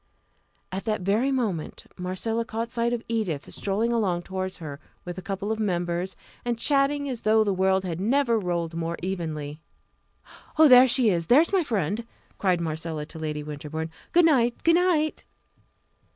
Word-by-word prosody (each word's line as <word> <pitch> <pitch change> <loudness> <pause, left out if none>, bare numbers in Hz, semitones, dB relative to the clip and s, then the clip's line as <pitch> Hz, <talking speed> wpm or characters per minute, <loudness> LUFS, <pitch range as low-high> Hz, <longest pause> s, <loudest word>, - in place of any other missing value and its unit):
At 190 +1 -4
that 215 -3 -1
very 215 +9 +1
moment 215 - -2
Marcella 185 +6 -2
caught 230 +1 -4
sight 235 0 0
of 240 -1 -2
Edith 205 -11 -2
strolling 215 +4 0
along 185 -7 0
towards 190 0 -4
her 145 -4 -7 0.3
with 175 +1 -5
a - - -7
couple 195 +2 -3
of 220 - -2
members, 175 -2 -1 0.3
and 240 -1 -1
chatting 285 +2 +1
as 250 -4 -4
though 220 0 +4
the 205 -2 0
world 190 0 +2
had 175 -1 -4
never 235 +1 +2
rolled 170 -3 -2
more 165 0 -3
evenly. 155 -5 -4 1.0
"Oh! 315 0 +8
there 255 -1 +8
she 245 -3 +4
is 170 -2 -1
there 265 +5 +7
is 335 - -1
my 380 -3 +4
friend!" 220 - -2 0.3
cried 185 -3 +2
Marcella 160 -1 -3
to 160 +1 -11
Lady 150 -1 -3
Winterbourne. 150 +2 -5 0.2
"Good 345 0 +5
night 245 -7 +2
good 330 - +5
night!" 335 -3 +2
195 Hz, 170 wpm, -26 LUFS, 170-235 Hz, 1.0 s, Oh